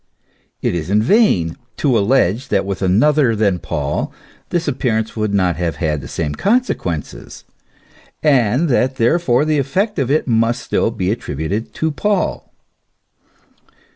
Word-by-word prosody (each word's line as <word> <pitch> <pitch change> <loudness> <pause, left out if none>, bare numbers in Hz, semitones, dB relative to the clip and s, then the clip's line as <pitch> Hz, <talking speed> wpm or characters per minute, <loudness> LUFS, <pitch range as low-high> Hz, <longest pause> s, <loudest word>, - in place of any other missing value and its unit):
It - - +1
is 85 -1 -3
in 105 +2 +3
vain 110 - +3 0.2
to 135 -5 +1
allege 110 0 +2
that 100 -1 0
with 100 -2 -4
another 115 +7 +3
than 100 -4 +1
Paul - - -3 0.4
this 175 -2 -1
appear 125 -5 0
ance 110 0 -3
would 110 -2 -1
not 90 -5 +1
have 85 -3 -2
had 75 -3 -1
the - - -8
same 75 -3 -3
consequences, 195 - -2 0.8
and 135 0 +3
that 130 -1 +1
therefore 130 +2 +2
the 155 -1 +1
effect 190 - -1
of 135 -2 0
it 150 +1 +1
must 115 +1 +1
still - - 0
be 100 -5 -2
attributed 95 - -3
to 160 0 -1
Paul. 205 +5 -1
115 Hz, 145 wpm, -18 LUFS, 95-145 Hz, 0.8 s, in